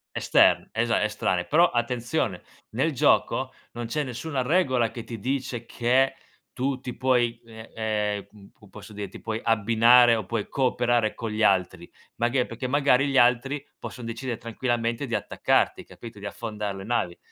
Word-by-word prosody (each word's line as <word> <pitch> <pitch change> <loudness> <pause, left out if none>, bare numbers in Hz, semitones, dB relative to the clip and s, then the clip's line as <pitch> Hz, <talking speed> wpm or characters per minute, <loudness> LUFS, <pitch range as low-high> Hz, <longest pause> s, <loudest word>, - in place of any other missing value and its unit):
Esterne, - - +3
esa 115 +1 +1
estranee. 95 -4 0
Però 170 +4 +4
attenzione, 120 - -1 0.3
nel - - 0
gioco - - +2 0.2
non 120 0 -5
c'è 150 +7 -1
nessuna 130 +2 -3
regola 130 -6 +2
che 115 0 -8
ti 115 - -7
dice 130 -1 -3
che 130 +3 +2 0.4
tu 130 +1 -2
ti 125 -2 -7
puoi, 120 -3 +1
ehm 110 -1 -12
ehm, 105 -2 -2
m 100 -2 -16
come 105 -3 -20
posso 105 +1 -12
dire, 100 -1 -6
ti - - -12
puoi 110 -1 -3
abbinare 115 +2 +5
o 110 - -3
puoi 110 +1 -3
cooperare 120 -4 +1
con 115 -1 -5
gli 110 +1 -2
altri, 95 -3 +1 0.3
magari 120 +2 +1
perché 115 +3 -5
magari 140 0 +3
gli 135 -1 +1
altri 130 +4 +2
posson 125 - -8
decidere 115 0 -4
tranquillamente 115 +2 -2
di 120 - -4
attaccarti, - - 0
capito? 115 -3 -12
Di 100 - -7
affondare 105 -1 -5
le 95 - -8
navi. 95 -7 -1
115 Hz, 165 wpm, -25 LUFS, 110-125 Hz, 0.4 s, abbinare